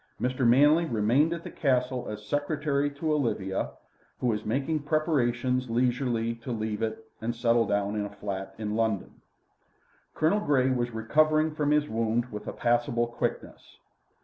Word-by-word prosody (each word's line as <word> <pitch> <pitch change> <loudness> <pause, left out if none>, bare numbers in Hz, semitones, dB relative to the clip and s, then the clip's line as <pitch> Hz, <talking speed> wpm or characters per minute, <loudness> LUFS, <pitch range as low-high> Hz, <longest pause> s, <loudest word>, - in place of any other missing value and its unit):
Mr. 125 0 +1
Manley 145 +7 +5
remained 125 +5 +2
at 170 0 -4
the - - -7
Castle 130 -3 0
as 105 0 -7
secretary 145 +2 0
to 150 +2 -2
Olivia, 105 -9 -1 0.5
who - - -3
was 110 -3 0
making 135 +8 -1
preparations 130 -5 0
leisurely 120 -1 0
to 115 +2 -8
leave 110 -1 -3
it 110 0 -3 0.2
and 120 +1 -2
settle 115 -1 +2
down 100 0 0
in 105 - -1
a - - -5
flat 100 -1 -6
in 105 -1 -3
London. 110 -3 -1 0.9
Colonel 165 +7 +2
Grey 130 -9 +2
was 120 -1 0
recovering 155 +7 +2
from 150 -1 0
his 150 0 +3
wound 115 +1 -1
with 105 0 -7
a - - -2
passable 120 0 +1
quickness. 120 0 -5
120 Hz, 155 wpm, -28 LUFS, 110-145 Hz, 0.9 s, Manley